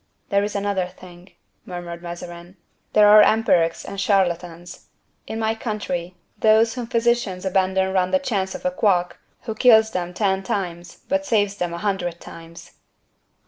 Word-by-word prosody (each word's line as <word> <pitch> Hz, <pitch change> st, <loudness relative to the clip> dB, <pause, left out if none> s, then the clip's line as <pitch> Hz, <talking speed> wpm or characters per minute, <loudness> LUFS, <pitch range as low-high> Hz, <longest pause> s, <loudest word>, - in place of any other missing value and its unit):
"There 200 Hz, -1 st, +2 dB
is 205 Hz, 0 st, -4 dB
another 200 Hz, -2 st, -1 dB
thing," 180 Hz, 0 st, -15 dB, 0.3 s
murmured 175 Hz, -1 st, -7 dB
Mazarin; 175 Hz, +1 st, -9 dB, 0.4 s
"there 210 Hz, -1 st, +6 dB
are 210 Hz, +1 st, +8 dB
empirics 180 Hz, -6 st, +2 dB
and 195 Hz, -, -5 dB
charlatans. 175 Hz, -3 st, -1 dB, 0.4 s
In 220 Hz, -, -5 dB
my 220 Hz, 0 st, 0 dB
country, 185 Hz, -6 st, -4 dB, 0.2 s
those 220 Hz, +1 st, +4 dB
whom 245 Hz, -2 st, -5 dB
physicians 230 Hz, -6 st, 0 dB
abandon 190 Hz, 0 st, +1 dB
run 185 Hz, -1 st, +1 dB
the 280 Hz, -, +3 dB
chance 200 Hz, -9 st, -2 dB
of -, -, -9 dB
a 180 Hz, -, +1 dB
quack, 180 Hz, -2 st, +1 dB, 0.3 s
who 225 Hz, -, -4 dB
kills 220 Hz, -1 st, +5 dB
them 180 Hz, 0 st, -4 dB
ten 195 Hz, -2 st, 0 dB
times 175 Hz, -3 st, -5 dB
but 285 Hz, +1 st, -1 dB
saves 205 Hz, -5 st, +1 dB
them 175 Hz, -2 st, -2 dB
a 170 Hz, -, -5 dB
hundred 175 Hz, -3 st, -2 dB
times." 165 Hz, 0 st, -12 dB
190 Hz, 155 wpm, -22 LUFS, 175-215 Hz, 0.4 s, are